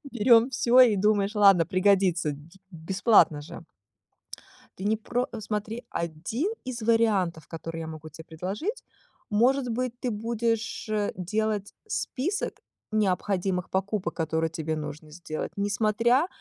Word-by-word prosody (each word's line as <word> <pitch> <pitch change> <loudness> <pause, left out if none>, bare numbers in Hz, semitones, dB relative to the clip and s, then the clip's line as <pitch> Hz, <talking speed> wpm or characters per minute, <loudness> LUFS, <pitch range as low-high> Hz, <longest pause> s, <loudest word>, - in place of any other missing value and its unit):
Берем 235 0 +5
всё 250 0 +4
и 230 -5 +6
думаешь: 205 +1 +2
ладно, 195 -5 +6
пригодится 185 -4 +2
ди 155 +6 -14
бесплатно 175 -2 +3
же. 150 - -9 1.2
Ты 190 - -7
не 215 +2 +1
про 245 +3 -2
смотри, 215 +3 -4
один 170 - -3
из 240 -3 -5
вариантов, 210 -8 +1
которые 165 0 -6
я 160 - -6
могу 155 0 -8
те 160 +2 -11
предложить. 195 - -5 0.5
Может 250 +4 +2
быть, 245 +1 -3
ты 250 - -2
будешь, 225 +1 -2
э, 210 -1 0
делать 210 +2 -2
список 370 +1 -2 0.4
необходимых 190 -3 0
покупок, 195 +1 -1
которые 160 0 -1
тебе 160 0 -3
нужно 150 0 -7
сделать, 155 -1 -5
несмотря 215 - +2
205 Hz, 130 wpm, -27 LUFS, 170-230 Hz, 1.2 s, и